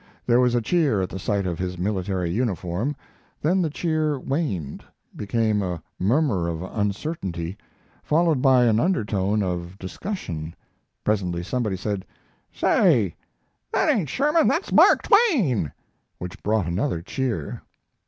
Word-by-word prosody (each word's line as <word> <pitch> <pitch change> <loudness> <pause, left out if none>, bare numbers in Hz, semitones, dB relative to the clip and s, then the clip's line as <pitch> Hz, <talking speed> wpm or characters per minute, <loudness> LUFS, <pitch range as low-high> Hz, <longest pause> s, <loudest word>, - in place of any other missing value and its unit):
There 120 0 +4
was 125 -1 +3
a 120 - +2
cheer 145 - +2
at 90 - -3
the 95 - -5
sight 100 +1 -1
of 85 -3 -3
his 90 0 -3
military 95 -2 -1
uniform. 100 - -1 0.4
Then 180 +5 +2
the 165 - +1
cheer 155 -2 0
waned, 120 - -3 0.3
became 110 0 0
a 90 -4 -3 0.2
murmur 110 - +2
of 85 0 -3
uncertainty, 100 - -3 0.5
followed 160 -3 +2
by 130 -2 +5
an 110 -2 +3
undertone 105 - +1
of 90 0 -4
discussion. 95 - -5 0.5
Presently 90 -5 0
somebody 110 -1 -1
said: 100 -1 -3 0.5
"Say, 120 - +3 0.6
that - - +3
ain't 175 - -1
Sherman, 300 - +3
that's 345 - 0
Mark - - +6
Twain," 185 - +3 0.5
which 90 +3 -8
brought 105 -3 +1
another 85 - -1
cheer. 115 - -3
105 Hz, 135 wpm, -24 LUFS, 90-145 Hz, 0.6 s, Mark